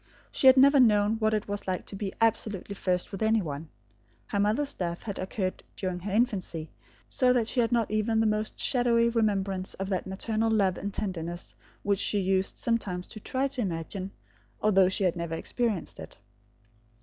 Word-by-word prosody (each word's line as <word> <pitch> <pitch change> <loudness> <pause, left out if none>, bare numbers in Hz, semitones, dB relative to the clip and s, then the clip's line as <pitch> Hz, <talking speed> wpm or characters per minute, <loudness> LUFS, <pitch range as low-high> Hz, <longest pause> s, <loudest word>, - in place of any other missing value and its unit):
She 265 - +3
had 260 0 +9
never 280 +2 +7
known 215 -2 +4
what 215 -1 +1
it 210 - -2
was 205 0 -2
to 185 +1 -4
be 195 -1 -3
absolutely 215 -3 0
first 180 -2 -1
with 195 - -6
any 220 +1 +3
one. 150 0 -6 0.6
Her 200 - -2
mother's 220 +8 +1
death 170 -1 -4
had 200 -4 -5
occurred 185 0 -3
during 185 -2 -3
her 195 +3 -5
infancy, 190 -8 -1 0.4
so 255 -1 +2
that 235 -3 +1
she 250 - -2
had 230 0 +2
not 235 -3 +1
even 215 +1 +1
the 225 - +3
most 215 0 -1
shadowy 235 -2 +3
remembrance 195 -5 0
of 195 0 -4
that 190 -2 -2
maternal 220 +4 -1
love 195 -5 +2
and 200 - -4
tenderness 175 -4 -4 0.3
which 200 -1 +1
she 205 - +1
used 190 0 0
sometimes 195 -6 -1
to 215 - -9
try 260 +5 -1
to 265 -2 -4
imagine, 185 0 -3 0.5
although 195 -3 +4
she 195 +2 -1
had 180 -3 +2
never 170 -1 -3
experienced 220 0 -2
it. - - -10
205 Hz, 185 wpm, -28 LUFS, 185-225 Hz, 0.6 s, had